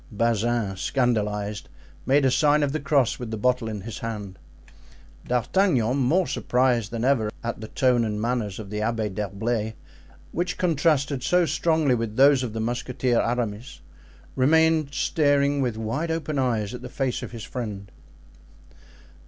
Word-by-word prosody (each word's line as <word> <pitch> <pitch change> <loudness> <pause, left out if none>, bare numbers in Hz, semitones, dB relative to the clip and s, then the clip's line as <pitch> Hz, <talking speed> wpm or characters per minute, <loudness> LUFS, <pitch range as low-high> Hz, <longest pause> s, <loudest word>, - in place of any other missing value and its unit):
Bazin, 115 -1 0
scandalized, 105 -4 -1 0.4
made 135 +1 +4
a 130 - +4
sign 150 +1 +3
of 140 - 0
the 155 - -2
cross 140 -4 +1
with 120 -2 -5
the 110 - -4
bottle 125 0 +1
in 105 -2 -5
his 110 +2 -7
hand. 105 -4 -6 0.9
D'Artagnan, 125 - +1
more 150 +8 +2
surprised 125 -7 +1
than 115 +1 -3
ever 125 -6 +2
at 115 -2 -4
the 110 - -6
tone 125 -1 +2
and 105 -2 -2
manners 115 -4 -2
of 105 -2 -8
the 105 - -3
Abbé 110 -2 -1
d'Herblay, 105 +2 -2 0.6
which 180 +2 -2
contrasted 150 -5 +1
so 180 +6 +3
strongly 155 -2 +1
with 115 -3 -2
those 135 +1 +5
of 120 -4 -4
the 115 - -4
Musketeer 120 +1 0
Aramis, 120 0 -3 0.5
remained 160 +2 +3
staring 145 -1 +2
with 120 -4 -1
wide 115 +10 -2
open 155 -3 -2
eyes 115 -5 0
at 125 - -7
the - - -8
face 130 -3 -2
of - - -6
his 115 -3 -8
friend. 105 -6 -6
125 Hz, 155 wpm, -25 LUFS, 110-140 Hz, 0.9 s, those